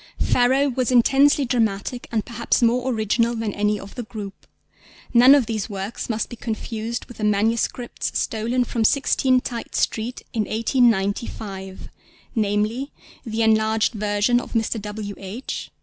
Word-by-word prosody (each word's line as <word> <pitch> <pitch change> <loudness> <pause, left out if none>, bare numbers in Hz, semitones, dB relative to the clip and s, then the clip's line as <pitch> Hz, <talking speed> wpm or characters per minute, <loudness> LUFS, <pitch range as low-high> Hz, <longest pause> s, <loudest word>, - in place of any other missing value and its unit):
Pharaoh 260 +3 +3
was 255 -1 -1
intensely 270 +3 +4
dramatic 235 -1 -1
and 220 -2 -1
perhaps 235 +1 0
more 245 +2 +2
original 230 +1 +1
than 225 -3 -2
any 210 0 0
of 200 0 -10
the 245 - -5
group. 210 -3 -9 0.7
None 250 +3 +8
of 275 -4 +3
these 215 -1 -3
works 200 +4 -5
must 220 -1 -1
be 240 - -8
confused 225 0 -4
with 240 - -13
the 215 - -5
manuscripts 220 +4 0
stolen 235 +3 0
from 230 -1 -2
16 260 0 +3
Tite 235 -2 -6
Street 230 +3 -1
in 220 -3 0
1895—namely, 215 +1 -1 0.4
the 225 0 0
enlarged 220 +1 +2
version 210 +3 +1
of - - -10
_Mr. 225 -1 0
W. 210 0 -5
H. 200 +7 -6
225 Hz, 140 wpm, -22 LUFS, 210-245 Hz, 0.7 s, None